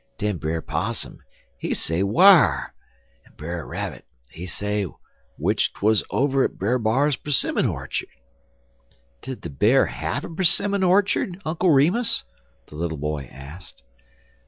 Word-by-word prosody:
Den 105 -2 -1
Brer 80 0 -2
Possum, 95 +10 -3 0.4
he - - -2
say 80 +3 0
whar, 170 - +5 0.5
en - - -24
Brer 85 -2 -6
Rabbit, - - -5 0.3
he 90 +3 -8
say 105 +2 -2 0.5
w'ich - - 0
'twuz 110 +1 +2
over 135 -1 +2
at - - -2
Brer 120 +7 0
B'ar's 130 +6 +1
'simmon 145 - +2
orchard." - - -4 1.1
"Did 130 0 -7
the 85 - -6
Bear 110 - +4
have 140 +4 -4
a 170 +3 -4
'simmon 200 +3 +3
orchard, 190 0 +2
Uncle 170 +3 +1
Remus?" 180 - +3 0.4
the - - -17
little 80 -1 -3
boy 75 -1 -3
asked. 70 +2 -10
110 Hz, 135 wpm, -23 LUFS, -, 1.1 s, whar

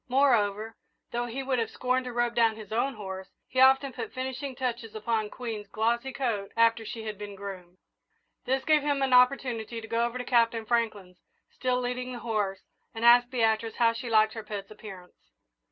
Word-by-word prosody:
Moreover, 225 -5 +2 0.4
though 240 0 -2
he 260 +3 -4
would 260 -2 0
have 225 - -1
scorned 255 0 -1
to 250 - -4
rub 240 0 0
down 230 -2 +3
his 215 -2 -11
own 255 +5 0
horse, 190 -2 -7 0.2
he 255 - -2
often 265 0 +5
put 445 - -6
finishing 260 +1 -4
touches 240 -4 -4
upon 215 0 -1
Queen's 220 -4 -6
glossy 235 +5 0
coat 230 -7 -2
after 230 0 +4
she 225 +1 -6
had 215 -2 -6
been 205 -1 -7
groomed. 185 -3 -9 0.7
This 265 +1 0
gave 310 -2 +4
him 285 -1 0
an 265 -1 +1
opportunity 250 -3 +3
to 225 - -9
go 230 +1 0
over 240 +1 -2
to 250 - -4
Captain 230 -2 +2
Franklin's, 215 -6 -1 0.3
still 250 -1 -1
leading 250 0 -3
the - - -5
horse, 210 -5 -2 0.3
and 225 +1 -2
ask 245 +1 +7
Beatrice 225 -2 +1
how 230 -1 +3
she 235 +1 -6
liked 220 -1 +4
her 225 - -5
pet's 205 -1 -7
appearance. 185 - -13
230 Hz, 190 wpm, -28 LUFS, 215-250 Hz, 0.7 s, ask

